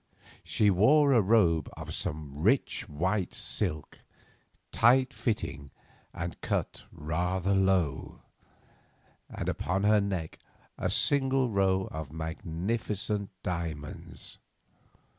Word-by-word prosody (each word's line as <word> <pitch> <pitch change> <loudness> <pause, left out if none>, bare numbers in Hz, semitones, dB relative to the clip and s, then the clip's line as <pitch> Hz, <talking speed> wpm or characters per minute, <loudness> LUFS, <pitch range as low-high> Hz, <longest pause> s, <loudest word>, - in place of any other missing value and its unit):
She 105 -2 +2
wore 140 +10 +5
a 120 - +5
robe 95 -7 +3
of - - -6
some 75 -2 -4
rich 115 - +1
white 90 +5 -1
silk, 80 -8 -2 0.7
tight 125 +2 +4
fitting 70 - -3 0.4
and 85 -1 -6
cut - - -2
rather 90 +5 -1
low, 95 -7 +1 1.1
and - - -5
upon 95 +2 -1
her 105 0 +5
neck 95 -5 -3 0.4
a - - -2
single 135 -3 +2
row 95 -1 +2
of 80 -3 -6
magnificent 95 +6 -3
diamonds. 80 -4 -5
95 Hz, 100 wpm, -29 LUFS, 80-110 Hz, 1.1 s, wore